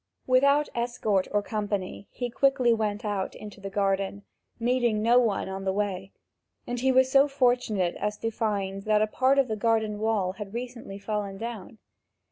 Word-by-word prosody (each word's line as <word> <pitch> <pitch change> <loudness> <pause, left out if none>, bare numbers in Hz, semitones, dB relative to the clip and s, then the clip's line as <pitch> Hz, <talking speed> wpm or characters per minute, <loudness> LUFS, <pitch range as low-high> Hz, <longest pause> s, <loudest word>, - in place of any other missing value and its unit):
Without 280 +3 +4
escort 235 -5 0
or 205 0 0
company 205 -2 -3
he 245 -1 -4
quickly 255 -2 +3
went 215 0 -2
out 200 -2 -2
into 210 -1 -10
the 195 - -5
garden, 195 0 -1 0.4
meeting 235 -2 +1
no 240 +2 +5
one 220 -7 0
on 190 0 -5
the 190 - 0
way, 195 -1 -2 0.5
and 245 0 -3
he 265 +2 +2
was 260 0 +4
so 275 +1 +6
fortunate 245 -9 +1
as 210 0 -2
to 225 - -2
find 200 -3 -2
that 215 0 +3
a - - +4
part 260 +5 +2
of 275 -2 +4
the 220 - -2
garden 220 -1 0
wall 215 -4 +1
had 205 +2 -8
recently 240 -5 -6
fallen 200 -1 -3
down. 225 -1 -7
215 Hz, 175 wpm, -27 LUFS, 200-245 Hz, 0.5 s, so